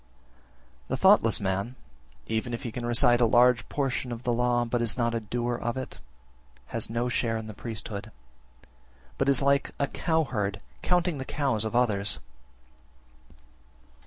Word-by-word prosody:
19. - - -33 0.7
The - - -2
thoughtless - - +5
man, 100 +5 -2 0.5
even 115 +2 -2
if - - -9
he 120 - -4
can 120 +2 -5
recite 120 0 +5
a - - +6
large 120 +1 +4
portion 130 -3 -2
(of 120 +1 -6
the 120 - +1
law), 120 0 +1
but 120 0 -1
is 115 -1 0
not 115 -1 +1
a 115 - 0
doer 120 +2 -2
of 120 +1 -3
it, 130 - -6 0.7
has 115 -2 -2
no 115 +2 -1
share 115 -2 0
in 110 - -6
the 110 - -8
priesthood, 110 -1 -6 1.1
but 135 - +2
is 140 0 +3
like 140 0 +2
a 140 - +1
cowherd 125 - -1 0.2
counting 175 -4 +1
the - - -3
cows 135 -6 -1
of 110 +1 -3
others. 105 -4 +1
120 Hz, 160 wpm, -27 LUFS, 110-125 Hz, 1.1 s, a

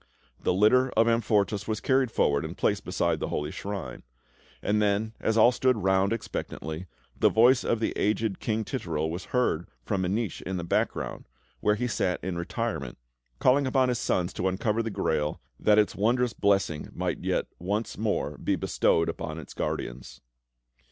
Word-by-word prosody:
The - - +1
litter 110 +8 +4
of 115 +1 +4
Amfortas 105 -3 +1
was 110 -1 -1
carried 130 -2 +2
forward 70 -9 +1
and - - -6
placed - - +1
beside - - 0
the - - -2
holy 75 +1 -2
shrine; 100 -2 -5 0.6
and 105 +1 +2
then, 105 +2 +1
as 110 0 0
all 115 +2 +7
stood 125 -1 +2
round 95 0 +2
expectantly, 85 -6 -4 0.3
the - - +4
voice 120 +3 +5
of 115 - 0
the 110 - 0
aged 105 -1 0
King 110 -1 -1
Titurel 80 - -2
was 85 +2 -5
heard 120 -10 0 0.2
from 95 -1 0
a 90 - 0
niche 105 +1 -2
in 95 0 -4
the 85 - -3
background, 85 - -2 0.3
where 105 - +2
he 125 - -2
sat 95 -6 0
in 95 -1 -3
retirement, 85 - -3 0.4
calling 135 - +3
upon 130 -1 +3
his 120 -2 0
son 90 - +1
to 95 - -2
uncover 105 +4 0
the 115 - -3
Grail, 75 -7 -1 0.2
that 105 0 +4
its 105 -1 +3
wondrous 120 +3 +1
blessing 95 -8 +1
might - - -2
yet - - 0
once 105 +6 -2
more 110 0 -2
be - - 0
bestowed 85 - +2
upon - - -4
its - - -9
guardians. - - -4
105 Hz, 175 wpm, -27 LUFS, 90-115 Hz, 0.6 s, all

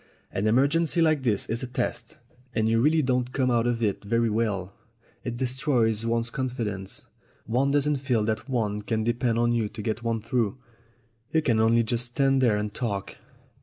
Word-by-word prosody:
An 100 +3 -1
emergency 145 +9 +3
like 155 -3 +3
this 110 -6 +1
is 115 +1 -1
a 130 - -4
test, 125 - -3 0.4
and 110 0 +2
you 115 0 +3
really 155 +3 +3
don't 125 -1 0
come 130 -2 +1
out 120 0 +2
of 120 -1 0
it 105 -2 0
very 115 +2 +1
well. 100 -4 -1 0.5
It 120 -1 -4
destroys 125 -4 +1
one's 115 0 0
confidence. 110 -7 -3 0.4
One 125 +5 +1
doesn't 145 +1 +2
feel 125 -5 0
that 110 +5 -2
one 105 -5 -1
can 110 +1 -1
de 120 +1 +1
pend 120 -1 0
on 120 0 +2
you 115 -3 0
to 110 0 -8
get 110 +2 -2
one 115 -1 -1
through. 115 +1 -1 0.7
You 160 -1 +2
can 115 -6 +2
only 115 +1 +4
just 120 +2 -1
stand 135 +2 +2
there 115 -5 +3
and 105 0 -3
talk." 100 -6 -4
115 Hz, 190 wpm, -26 LUFS, 110-130 Hz, 0.7 s, only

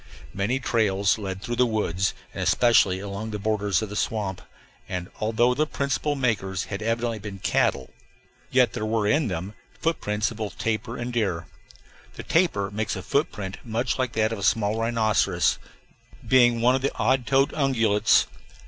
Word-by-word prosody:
Many 105 +7 0
trails 105 -4 +1
led 95 -2 -5
through 120 -1 -3
the 125 0 +4
woods, 95 -4 -1 0.2
and - - -5
especially 110 -6 +4
along 100 +2 -5
the 105 - -3
borders 105 -1 0
of 110 - -5
the 105 - -7
swamp; 100 -4 -2 0.5
and, 90 -1 -4
although 115 +3 +2
their 155 +4 0
principal 140 +1 -1
makers 100 -8 -1
had 100 0 -6
evidently 115 0 -1
been 100 -1 -7
cattle, 70 -7 0 0.6
yet 125 -3 +3
there - - -4
were 110 -1 0
in 130 +7 +2
them 95 +1 -4 0.3
footprints 105 -10 -1
of 110 - -9
both 110 -2 -5
tapir 115 +1 -2
and 120 +1 -4
deer. 95 -8 -1 0.7
The - - -7
tapir 135 - +1
makes 110 +1 -2
a - - -6
footprint 105 - -2
much 120 +3 -2
like 130 -2 -1
that 110 0 +1
of 110 - -5
a - - -7
small 105 +2 +2
rhinoceros, 115 -2 +1 0.7
being 120 -3 +5
one 125 +2 +4
of 130 - 0
the 140 - -1
odd 130 +1 +1
toed 135 0 +3
ungulates. 115 -7 +3
110 Hz, 170 wpm, -25 LUFS, 100-120 Hz, 0.7 s, being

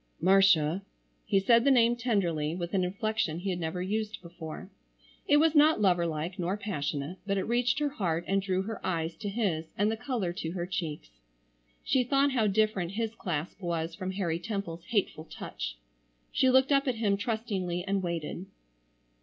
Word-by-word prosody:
"Marcia!" 185 -2 +4 0.5
He 200 -2 +3
said 230 +4 +5
the 280 - +4
name 240 -3 +5
tenderly, 175 -10 0
with 175 0 -4
an 190 -2 +2
inflection 200 -2 -1
he 190 +3 -2
had 180 - -3
never 170 +2 -2
used 215 +2 -2
before. 170 -2 -8 0.6
It 290 - +6
was 315 +1 +4
not 300 -3 +5
lover 180 -4 +3
like, 165 +3 -4
nor 180 +3 -1
passionate, 150 -4 -3
but 200 0 +1
it 190 - 0
reached 245 +4 +1
her 295 -1 +1
heart 175 - -2
and 195 0 +2
drew 190 -1 0
her 220 +1 -6
eyes 165 -2 -1
to 210 -2 -4
his 195 -7 -1
and 205 +2 +2
the - - -1
color 225 -7 -2
to 165 -1 -4
her 175 -2 -2
cheeks. 165 - -4 0.7
She 260 -2 +2
thought 275 +3 +2
how 230 -5 +2
different 200 -3 +1
his 225 +1 -2
clasp 175 -1 -4
was 165 -2 -2
from 185 +2 -4
Harry 170 -4 -1
Temple's 175 -4 -5
hateful 185 -6 -1
touch. - - -6 0.5
She 260 - +3
looked 260 +2 +4
up 275 0 +3
at 255 - +1
him 215 -3 +1
trustingly, 200 -5 -2
and 195 0 0
waited. 170 +1 -4
195 Hz, 180 wpm, -29 LUFS, 170-220 Hz, 0.7 s, It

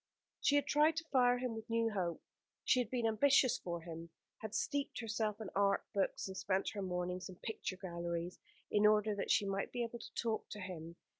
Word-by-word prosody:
She 285 - +3
had 285 -1 +4
tried 300 +2 +4
to 325 - -2
fire 245 -2 +5
him 250 -1 -2
with 220 0 -7
new 230 0 +2
hope; 180 -5 -2 0.4
she 255 - +4
had 240 -3 0
been 245 -2 0
ambitious 255 +3 +4
for 170 -1 -4
him; 165 0 -7 0.3
had 220 -1 -5
steeped 285 -1 -1
herself 215 -2 -1
in 215 -3 -6
art 200 0 +3
books, 195 0 0
and 190 - -6
spent 190 0 0
her 205 - -4
mornings 180 0 -2
in 185 - -9
picture 185 -1 -4
galleries, 170 -1 -4 0.3
in 210 0 +5
order 210 0 +4
that 200 - -3
she 205 - +4
might 195 0 -2
be 245 -1 -1
able 235 0 -5
to - - -10
talk 225 -2 -1
to 210 - -6
him. 170 -3 -6
210 Hz, 210 wpm, -36 LUFS, 185-235 Hz, 0.4 s, fire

